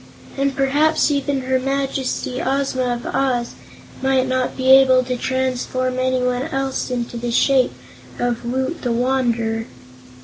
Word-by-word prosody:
And 275 0 0
perhaps 295 +4 +2
even 280 -1 0
her 260 0 0
Majesty, 270 -1 -2
Ozma 260 -2 0
of 240 - -8
Oz, 245 -3 -1 0.5
might 265 -1 +2
not 255 0 -1
be 260 0 +3
able 260 -1 +7
to 250 0 -2
transform 255 0 -1
anyone 255 +1 0
else 270 -3 -2
into 240 -1 -3
the 240 +1 -3
shape 260 +2 +3 0.4
of 240 -1 -1
Woot 260 +7 -2
the 245 - -1
Wanderer." 235 -2 0
260 Hz, 135 wpm, -20 LUFS, 250-270 Hz, 0.5 s, able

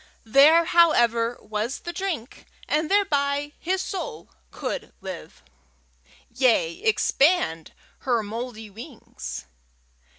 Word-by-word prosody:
There, 285 +8 +6
however, 240 -9 +3
was 215 +4 -4
the 345 - -6
drink, 345 - -5 0.2
and 305 +1 0
thereby 290 -7 +1
his 375 +2 -1
soul 445 +5 -6 0.2
could 445 -3 -5
live 185 -4 -9 0.9
yea, 230 -10 +2
expand 290 - +2 0.3
her 240 -4 0
mouldy 225 0 -6
wings! 235 +5 -9
275 Hz, 95 wpm, -24 LUFS, 225-335 Hz, 0.9 s, There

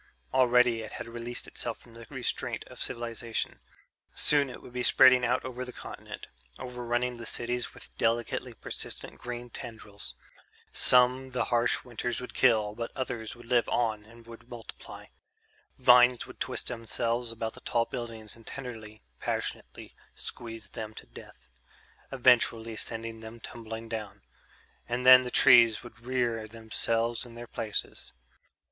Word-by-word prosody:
Already 125 -2 +4
it 110 - -8
had - - -6
released 120 +1 -5
itself 120 -2 -4
from 120 - -18
the 115 0 -12
restraint - - -2
of - - -13
cultivation; 115 -1 -3 0.6
soon 145 -2 +5
it - - -8
would 125 - -13
be 125 - -2
spreading 130 0 +7
out 125 +2 +1
over 125 0 -4
the 125 - -7
continent, - - -8 0.3
overrunning 125 -1 -2
the 115 - -8
cities 120 +1 -1
with - - -14
delicately 115 +1 0
persistent - - -4
green 120 0 -6
tendrils. 110 -4 -9 0.6
Some 125 +1 +4
the 125 -2 +1
harsh 120 0 +2
winters 120 0 -3
would 125 - -8
kill, 110 -5 +3
but 115 +1 -5
others 120 -4 -4
would 120 0 -14
live 120 0 +2
on 110 -3 0
and 115 +2 -16
would 115 +1 -13
multiply. 120 -2 -10 0.7
Vines 125 0 +6
would - - -13
twist - - -2
themselves 115 0 -1
about 110 -1 -4
the - - -12
tall 115 -1 +1
buildings 115 -4 -6
and 115 -1 -18
tenderly, 110 -5 -8 0.2
passionately - - -4 0.2
squeeze 115 -4 -5
them 110 +1 -7
to - - -9
death... 65 +1 -14 0.6
eventually 115 -3 +3
send 115 0 -3
them 110 +1 -9
tumbling 115 0 -7
down. 110 -3 -6 0.7
And 125 +1 -1
then 130 0 +11
the 125 - -4
trees 120 -4 +7
would 120 -2 -12
rear 120 -4 0
themselves 115 +1 -1
in 120 -2 -12
their 120 0 -7
places. 110 -2 -3
120 Hz, 150 wpm, -29 LUFS, 115-125 Hz, 0.7 s, then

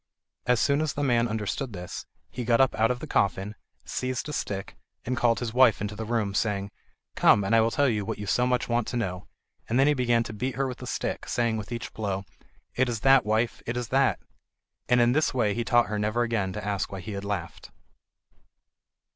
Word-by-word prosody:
As 125 -1 +3
soon 140 +6 +2
as 155 -2 -1
the 145 - -2
man 120 -3 +2
understood 110 +3 -3
this, 90 -1 -7 0.2
he 125 - -4
got 115 0 +3
up 135 -1 +4
out 110 +1 +2
of 125 0 -2
the - - -4
coffin, 100 -6 0 0.3
seized 130 +1 -3
a 150 - -5
stick, 100 -7 -4 0.3
and 125 - -1
called 120 -2 +2
his 115 0 -3
wife 125 -3 +5
into 105 +1 -4
the 110 - -5
room, 110 -3 -1
saying: 100 -1 -1 0.4
"Come, 100 - +5
and 100 +4 +2
I 115 - +6
will 115 - +3
tell 140 +4 +2
you 105 -5 0
what 110 +3 -4
you 105 - -6
so 125 +5 +2
much 125 -1 0
want 120 -1 0
to 125 - -3
know"; 90 -5 -3 0.4
and 115 - +1
then 135 - +6
he 150 - +4
began 120 -3 +2
to 110 - -7
beat 125 +5 -3
her 135 0 0
with 125 - -6
the - - -7
stick, - - -3
saying 115 -2 0
with 105 +2 -7
each 115 -2 -5
blow: 100 -3 -3 0.5
"It 130 0 +1
is 115 -3 -3
that, 135 -4 +5
wife, 110 +2 0
it 120 +1 -2
is 120 -3 -3
that!" 135 +1 +3 0.7
And 125 0 +5
in 120 0 +4
this 150 0 +1
way 110 -5 +2
he 120 - -1
taught 120 +1 +4
her 105 0 -3
never 110 +3 +1
again 110 -5 -1
to 105 0 -6
ask 100 -2 -2
why 95 - -5
he 105 - -7
had 100 0 -5
laughed. 100 -4 -5
115 Hz, 230 wpm, -27 LUFS, 105-125 Hz, 0.7 s, I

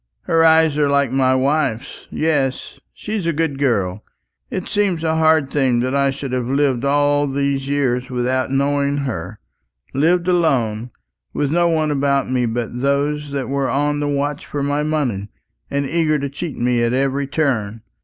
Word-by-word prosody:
Her 165 0 +2
eyes 160 -2 +4
are 145 -1 +3
like 140 -3 +2
my 130 -1 +2
wife's. 135 -3 -1
Yes, 145 -5 -1
she's 210 -5 -4
a 170 - +1
good 150 -3 -1
girl. 105 -7 0 0.5
It 185 - -4
seems 195 -6 0
a 160 0 +1
hard 160 -3 +3
thing 130 -4 +2
that 130 +1 -1
I 140 0 +2
should 135 -1 -5
have 125 -2 -1
lived 135 -2 +1
all 145 +1 +2
these 140 0 -1
years 130 -3 0
without 130 +1 -1
knowing 140 +1 0
her; 95 -3 -5 0.5
lived 170 +6 +2
alone, 125 -10 +1 0.5
with 145 -1 0
no 175 +1 +3
one 155 -2 +1
about 140 -1 +1
me 125 -2 +1
but 120 +1 -3
those 145 +2 0
that 140 -2 -3
were 140 -1 -1
on 145 +1 0
the 145 - -1
watch 145 0 -2
for 145 -1 -3
my 145 +1 0
money, 135 -10 -1 0.4
and 140 0 -1
eager 155 +1 +1
to 140 -1 -3
cheat 155 +2 -5
me 120 0 +1
at 120 +1 +1
every 135 +1 0
turn. 115 -8 -1
140 Hz, 175 wpm, -19 LUFS, 130-150 Hz, 0.5 s, eyes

